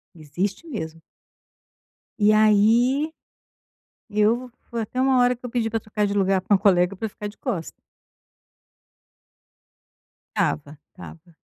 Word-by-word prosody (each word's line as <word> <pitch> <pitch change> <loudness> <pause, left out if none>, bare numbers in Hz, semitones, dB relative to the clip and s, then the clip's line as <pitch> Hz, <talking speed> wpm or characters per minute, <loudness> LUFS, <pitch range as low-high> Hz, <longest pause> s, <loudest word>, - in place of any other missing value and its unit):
Existe 180 - -4
mesmo. 165 - -6 1.2
E 210 0 +5
aí, 230 +8 +3 1.0
eu 225 +4 +1 0.2
foi 235 -1 -4
até 250 +4 -4
uma 265 0 +3
hora 245 0 +3
que 245 - -29
eu - - -8
pedi 230 -2 -1
pra 225 - 0
trocar 210 -1 -2
de 200 - -2
lugar 195 -1 +2
com 195 +2 +2
um - - +4
colega 185 -1 +3
pra 220 - -3
ficar 210 0 -7
de 205 - -14
costa. 165 -4 -3 2.6
Estava, 145 0 -1 0.2
estava. 170 -2 -13
210 Hz, 130 wpm, -23 LUFS, 185-235 Hz, 2.6 s, E